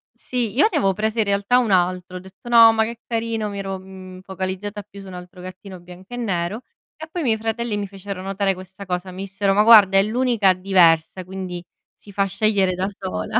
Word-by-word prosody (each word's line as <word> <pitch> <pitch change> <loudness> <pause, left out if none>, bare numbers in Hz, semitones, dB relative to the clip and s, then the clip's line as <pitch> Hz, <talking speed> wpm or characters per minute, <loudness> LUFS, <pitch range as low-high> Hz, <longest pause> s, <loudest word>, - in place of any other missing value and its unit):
Sì, 240 -4 -3
io 295 - +5
avevo 195 - +1
preso 220 +3 -2
in 215 - +3
realtà 200 +5 +2
un 235 -4 0
altro, 180 0 0
ho - - -7
detto: 190 +6 -13
"No, 230 -1 +8
ma 220 0 +2
che 235 +1 -8
carino", 225 -2 -2
mi 200 0 -6
ero, 195 -1 -4
mhmm, 185 -1 -12
focalizzata 190 +2 -5
più 200 -1 -13
su 195 - -12
un 185 - -10
altro 180 0 -11
gattino 185 0 -10
bianco 180 +5 -14
e - - -5
nero, 200 -1 -2 0.3
e 315 +1 -9
poi 350 - -3
i - - -3
miei 220 -2 +2
fratelli 225 0 -2
mi 200 -1 -3
fecero 195 -1 -8
notare 195 0 -1
questa 190 +2 -11
cosa. 180 0 -4
Mi 190 +2 -7
dissero: 195 0 0
"Ma 210 +1 +4
guarda 205 -4 +7
è 195 - +5
l'unica 225 -4 +2
diversa, 180 -2 +3
quindi 185 -1 -7 0.3
si 205 - -16
fa 200 0 0
scegliere 195 -1 +1
da 185 +2 -2
sola". 90 0 -2
195 Hz, 220 wpm, -21 LUFS, 185-220 Hz, 0.3 s, No